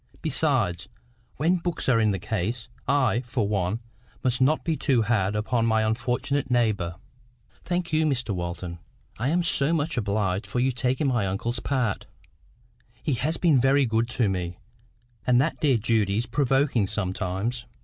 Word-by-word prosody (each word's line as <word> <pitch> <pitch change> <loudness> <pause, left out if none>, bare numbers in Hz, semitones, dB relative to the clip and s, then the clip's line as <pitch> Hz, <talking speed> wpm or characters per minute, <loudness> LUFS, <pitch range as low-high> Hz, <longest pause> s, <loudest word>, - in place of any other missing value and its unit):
Besides, 125 - +1 0.5
when 170 +6 +2
books 175 0 -3
are 125 -4 +4
in 110 -1 +3
the 100 - 0
case, 110 +5 -3 0.2
I, 135 -4 +2
for 120 -3 -1
one, 100 +2 -1 0.4
must 125 -1 +1
not 150 +4 +3
be 165 -2 0
too 130 -6 +2
hard 105 -3 +1
upon 115 +2 0
my 110 -1 +2
unfortunate 125 +5 -1
neighbour." 110 -8 +1 0.7
"Thank 175 -1 -2
you, 155 0 +3
Mr 130 -7 -1
Walton. 85 -1 -5 0.4
I 125 +4 0
am 175 +3 +2
so 155 -2 +3
much 160 -2 -1
obliged 100 -2 0
to 100 +5 -5
you 130 +2 +2
for 125 - -13
taking 130 +5 0
my 120 -7 +1
uncle's 115 +6 -2
part. 125 -8 -1 1.0
He 150 - 0
has 150 +7 -1
been 155 -8 +4
very 135 +1 +4
good 115 0 0
to 115 - +3
me; 90 -2 -3 0.7
and 125 -1 +5
that 155 +5 0
dear 140 -5 +4
Judy 105 -3 +1
is 115 - 0
provoking 135 -3 +1
sometimes. 100 +4 -2
120 Hz, 165 wpm, -25 LUFS, 105-140 Hz, 1.0 s, and